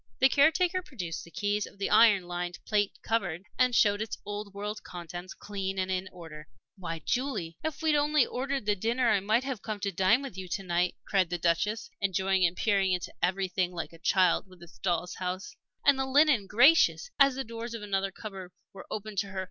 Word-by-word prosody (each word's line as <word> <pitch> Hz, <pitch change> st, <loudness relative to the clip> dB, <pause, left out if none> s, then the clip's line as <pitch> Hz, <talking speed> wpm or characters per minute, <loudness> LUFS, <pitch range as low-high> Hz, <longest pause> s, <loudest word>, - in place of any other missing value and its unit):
The 265 Hz, -, +5 dB
caretaker 335 Hz, +6 st, +3 dB
produced 205 Hz, -, -6 dB
the -, -, -13 dB
keys 205 Hz, +3 st, -1 dB
of -, -, -16 dB
the 195 Hz, -, -2 dB
iron 205 Hz, -6 st, +6 dB
lined 175 Hz, 0 st, -4 dB
plate 205 Hz, -2 st, +1 dB
cupboard, 190 Hz, -6 st, -1 dB, 0.2 s
and 250 Hz, -1 st, +3 dB
showed 205 Hz, -1 st, +4 dB
its 220 Hz, -, -4 dB
old 205 Hz, 0 st, -5 dB
world 205 Hz, +2 st, -5 dB
contents, 175 Hz, +1 st, -8 dB
clean 195 Hz, -2 st, -4 dB
and 185 Hz, 0 st, -1 dB
in 185 Hz, 0 st, -2 dB
order. 160 Hz, -4 st, -11 dB, 0.3 s
"Why, 165 Hz, -4 st, -6 dB
Julie! 215 Hz, -, -2 dB
If 315 Hz, 0 st, -4 dB
we'd 315 Hz, -1 st, +3 dB
only 295 Hz, -2 st, +3 dB
ordered 270 Hz, -1 st, -3 dB
the 210 Hz, -1 st, +2 dB
dinner 230 Hz, +4 st, +1 dB
I 205 Hz, -, +3 dB
might 215 Hz, +6 st, +1 dB
have 265 Hz, -5 st, -4 dB
come 215 Hz, -2 st, -5 dB
to 200 Hz, -, -1 dB
dine 195 Hz, +8 st, +3 dB
with 270 Hz, -9 st, -7 dB
you 185 Hz, -, -6 dB
to 195 Hz, +3 st, -3 dB
night!" 180 Hz, 0 st, 0 dB
cried 190 Hz, -4 st, +1 dB
the 175 Hz, -, -2 dB
Duchess, 175 Hz, +6 st, 0 dB
enjoying 190 Hz, -1 st, +2 dB
and 175 Hz, -, -6 dB
peering 195 Hz, -3 st, +2 dB
into 180 Hz, 0 st, -3 dB
everything 185 Hz, 0 st, 0 dB
like 170 Hz, 0 st, -5 dB
a 165 Hz, -, -14 dB
child 185 Hz, +2 st, +2 dB
with 185 Hz, -2 st, -16 dB
its 170 Hz, -, -16 dB
doll's 180 Hz, -1 st, -1 dB
house. 185 Hz, -, -5 dB, 0.3 s
"And 275 Hz, -1 st, +5 dB
the 265 Hz, -, 0 dB
linen 275 Hz, -6 st, +4 dB
gracious!" 300 Hz, -, +5 dB
as 275 Hz, -2 st, +6 dB
the 270 Hz, -, -2 dB
doors 230 Hz, 0 st, -6 dB
of 220 Hz, -, -7 dB
another 195 Hz, -1 st, -1 dB
cupboard 195 Hz, -2 st, -9 dB, 0.2 s
were 195 Hz, -, -11 dB
opened 215 Hz, -1 st, -4 dB
to 200 Hz, -, -1 dB
her. 190 Hz, -1 st, -6 dB
200 Hz, 210 wpm, -29 LUFS, 180-235 Hz, 0.3 s, iron